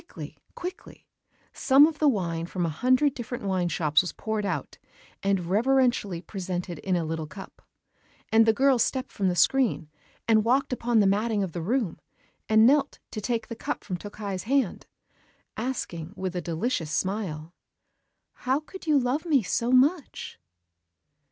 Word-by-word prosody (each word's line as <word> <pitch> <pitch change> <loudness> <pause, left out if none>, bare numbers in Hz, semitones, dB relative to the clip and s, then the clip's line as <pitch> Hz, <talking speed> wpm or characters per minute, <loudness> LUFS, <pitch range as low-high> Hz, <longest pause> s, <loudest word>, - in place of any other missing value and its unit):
_" - - -26
(Yes.) - - -40
Then - - -23
quickly, - - -8 0.2
quickly, 365 +2 -8 0.5
some 275 +1 +6
of 310 -1 -2
the 305 - +4
wine 170 -7 -2
from 180 -1 -2
a - - 0
hundred 255 - +2
different 240 -2 -6
wine 185 -3 0
shops 150 -1 +2
was 180 - -5
poured 215 -2 -3
out, 185 - -4 0.4
and 195 -3 0
reverentially 220 -3 +1
presented 180 -3 -5
in 190 -2 -1
a 170 -2 0
little 160 -1 -3
cup. 190 +4 -11 0.7
And 225 0 +5
the - - +7
girl 265 +2 +3
stepped 260 +3 0
from 195 - -1
the 180 - +1
screen, 215 - +2 0.4
and 220 -1 +4
walked 260 +4 +1
upon 235 -2 +2
the - - +3
matting 205 +1 +1
of 185 - -4
the 170 - -5
room, 215 0 -1 0.5
and 220 0 +6
knelt 280 +2 +3
to 215 - -5
take 230 +1 -1
the 230 - -6
cup - - -4
from 185 - -4
Tokkei's 200 0 -6
hand, 270 -8 0 0.7
asking, 195 -8 -4
with 185 -1 -3
a 180 - -1
delicious 165 +1 -2
smile: 170 -2 -3 0.8
"How 260 +3 0
could 335 +3 -12
you 300 -2 +4
love 275 +6 0
me 280 -7 +3
so 235 +6 -1
much?" 275 - +1
215 Hz, 170 wpm, -26 LUFS, 180-255 Hz, 0.8 s, the